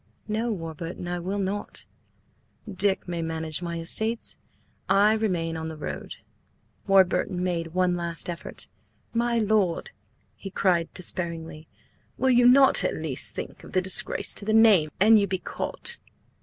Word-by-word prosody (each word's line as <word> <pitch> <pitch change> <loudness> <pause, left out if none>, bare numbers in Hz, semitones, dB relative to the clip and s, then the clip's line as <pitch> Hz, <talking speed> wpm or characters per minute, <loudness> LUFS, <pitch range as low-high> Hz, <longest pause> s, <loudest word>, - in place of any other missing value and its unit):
"No, 220 +2 -1
Warburton, 165 -1 -6
I 175 0 -3
will 190 +4 -4
not; 200 +1 -4 0.8
Dick 195 -1 0
may 170 -1 -3
manage 160 0 -4
my 170 -1 -4
estates. 220 +7 0 0.5
I 205 +2 +4
remain 180 -7 -1
on 160 0 -5
the 160 - -8
road." 150 - -6 0.7
Warburton 190 -1 +2
made 170 -2 -3
one 180 -1 +2
last 170 -1 -3
effort. 175 +1 -6 0.5
"My 235 0 0
lord!" 210 -5 0 0.4
he 195 - -9
cried 180 -3 0
despairingly, 165 -3 -3 0.5
"Will 265 0 +2
you 245 0 +5
not 270 +2 +5
at - - -1
least - - 0
think - - -7
of - - -13
the 185 - +3
disgrace 190 0 +5
to - - -4
the 215 +1 -1
name 215 -8 +5
an 220 +3 +6
you 200 -1 +2
be 190 0 -2
caught?" 470 - -3
185 Hz, 150 wpm, -25 LUFS, 170-215 Hz, 0.8 s, an